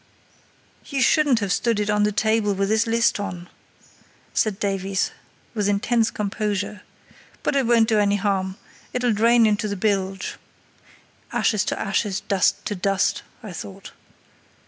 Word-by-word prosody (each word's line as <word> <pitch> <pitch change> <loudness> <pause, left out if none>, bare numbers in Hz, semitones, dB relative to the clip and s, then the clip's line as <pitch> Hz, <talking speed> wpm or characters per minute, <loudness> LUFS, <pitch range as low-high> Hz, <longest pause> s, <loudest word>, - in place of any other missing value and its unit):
"You 275 - -2
shouldn't 270 -2 +3
have 200 -2 0
stood 230 -1 +1
it 210 0 0
on 210 0 +2
the 210 0 +3
table 215 -1 +1
with 195 +1 0
this 220 +1 +2
list 230 -1 +2
on," 180 -3 -5 0.9
said 215 -2 0
Davies, 195 -1 -1 0.4
with 205 -3 0
intense 225 +3 +2
composure, 205 -1 -3 0.6
"but - - 0
it 270 -4 +2
won't 230 -2 +4
do 220 -2 +3
any 205 0 +3
harm; 195 -1 -1 0.4
it'll 245 -2 +1
drain 230 +2 +4
into 215 0 +1
the 200 - -3
bilge" 195 -1 -1 0.9
(ashes 215 -4 +1
to - - -2
ashes, 195 0 -1
dust 200 -3 +1
to - - -2
dust, 195 +1 0 0.2
I 205 -4 -7
thought). 100 - -9
210 Hz, 145 wpm, -23 LUFS, 195-225 Hz, 0.9 s, won't